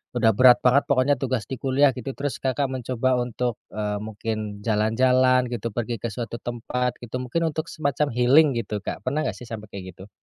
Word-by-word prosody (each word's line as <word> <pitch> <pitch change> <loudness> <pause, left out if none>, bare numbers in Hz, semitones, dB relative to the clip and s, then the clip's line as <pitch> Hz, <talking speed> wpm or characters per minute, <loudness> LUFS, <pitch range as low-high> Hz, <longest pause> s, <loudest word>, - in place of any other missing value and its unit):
udah 115 -2 +4
berat 125 +3 +7
banget 130 +3 +5
pokoknya, 140 +1 +3
tugas 125 -5 -1
di 130 - -3
kuliah", 135 +1 +3
gitu, 125 +2 -4
terus 145 -1 -3
Kakak 135 +2 +1
mencoba 130 0 -1
untuk, 120 -1 -2 0.2
eee, 105 -1 -2
mungkin 110 -1 -5
jalan-jalan, 125 +4 +3
gitu, 115 -1 -3
pergi 120 0 -2
ke 115 - -1
suatu 120 0 -5
tempat, 125 +1 -3
gitu, 120 +1 -7
mungkin 165 +5 -1
untuk 155 +1 -3
semacam 145 -1 0
healing, 135 +3 +5
gitu, 105 -1 -4
Kak, - - -5
pernah 145 +4 0
nggak - - -2
sih, 125 - -10
sampe 110 -2 -7
kayak 95 -2 -8
gitu? 95 +2 -13
125 Hz, 195 wpm, -24 LUFS, 110-130 Hz, 0.2 s, berat